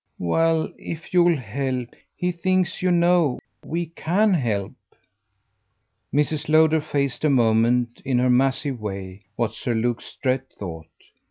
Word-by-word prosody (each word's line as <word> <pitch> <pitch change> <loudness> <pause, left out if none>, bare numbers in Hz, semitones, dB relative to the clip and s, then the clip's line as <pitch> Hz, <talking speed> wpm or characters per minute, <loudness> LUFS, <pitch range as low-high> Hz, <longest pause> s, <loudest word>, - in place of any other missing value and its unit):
"Well 165 - +1
if 165 +1 -8
you'll 175 -2 +4
help. 125 +1 -3 0.3
He 180 0 -1
thinks, 185 +1 0
you 185 - +2
know, 175 -5 +3 0.3
we 170 +2 -2
CAN 180 +6 +1
help." 110 - -1 1.4
Mrs. 150 +1 0
Lowder 160 0 +5
faced 140 -2 -2
a 155 - +4
moment, 120 -1 +2
in 130 -2 0
her 125 0 +3
massive 135 +1 +1
way, 95 -2 -6
what 115 -3 -1
Sir 120 0 -2
Luke 120 +1 0
Strett 130 0 -3
thought. 80 -5 -7
135 Hz, 135 wpm, -23 LUFS, 120-165 Hz, 1.4 s, Lowder